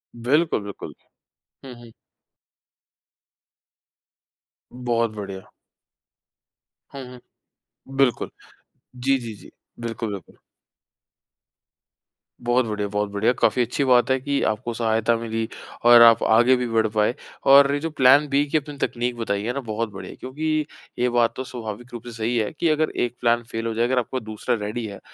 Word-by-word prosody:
बिल्कुल, 140 +2 +1
बिल्कुल। 100 -1 -8 0.7
हुँ, 130 -2 -9
हुँ। 115 -1 -14 2.8
बहुत 120 -2 -1
बढ़िया। 95 -2 -7 1.5
हुँ, 135 -1 -8
हुँ। 125 - -12 0.8
बिल्कुल, 135 -3 +1 0.7
जी, 135 +2 +1
जी, 115 -3 -7
जी। - - -15 0.3
बिल्कुल, 115 -2 -4
बिल्कुल। 95 -4 -9 2.1
बहुत 120 +1 +2
बढ़िया, 105 -2 -2
बहुत 105 0 -2
बढ़िया। 100 +4 +2
काफ़ी 125 - +3
अच्छी 125 +5 0
बात 125 0 +4
है 130 - +2
कि 140 +1 -1
आपको 110 +2 -1
सहायता 115 0 +1
मिली 115 -1 -3 0.4
और 120 0 +9
आप 115 -1 +7
आगे 120 +4 +5
भी 125 -1 -2
बढ़ 110 -1 +2
पाए। 105 +2 +1 0.3
और 140 +1 +7
ये 145 - 0
जो 165 +2 -3
प्लान 140 0 +5
बी 140 +1 +2
की 155 - +2
अपनी 145 -1 -6
तकनीक 120 -2 -2
बताई 100 -3 -2
है 120 +2 -2
ना 140 - -3
बहुत 115 -2 -3
बढ़िया 95 -1 -8
है। - - -12
क्योंकि 155 +3 -2 0.3
ये 125 0 +2
बात 120 -1 +2
तो 130 - -4
स्वाभाविक 120 0 -8
रूप 120 - -7
से 120 - -7
सही 115 +2 -1
है 110 -2 0
कि 165 - +2
अगर 155 0 +1 0.2
एक 120 - -7
प्लान 120 0 +2
फ़ेल 115 0 -3
हो 115 - -2
जाए, 115 +2 +1
अगर 125 0 +1
आपका 130 +2 -3
दूसरा 110 +1 -3
रेडी 110 +2 -4
है, 100 -2 -8
120 Hz, 160 wpm, -23 LUFS, 110-130 Hz, 2.8 s, और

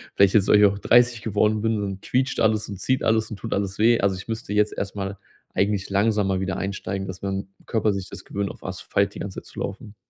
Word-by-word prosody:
vielleicht 100 -1 +5
jetzt 100 -2 +4
weil 105 - +6
ich 105 - +7
auch 100 0 +2
30 120 +1 +4
geworden 105 0 +1
bin, 110 -1 0
dann 100 -1 -4
quietscht 130 +1 0
alles 110 -1 +2
und 100 -3 -6
zieht 130 +6 0
alles 110 0 +2
und 110 - -5
tut - - -4
alles 100 0 -2
weh. 115 +2 +4
Also, 95 -1 +2
ich 95 - -9
müsste 110 -2 -4
jetzt 105 0 +3
erstmal 100 0 -4 0.4
eigentlich 100 0 0
langsamer 100 -1 +2
wieder 95 0 -2
einsteigen, 95 0 -3
dass 95 0 -7
mein 95 0 -3 0.2
Körper 110 -1 +1
sich 100 -1 -4
das - - -9
gewöhnt, 100 -1 -3
auf - - -11
Asphalt 100 +2 -1
die - - -7
ganze 100 -2 -5
Zeit - - -28
zu - - -10
laufen. 105 +1 -6
100 Hz, 240 wpm, -24 LUFS, 95-110 Hz, 0.4 s, ich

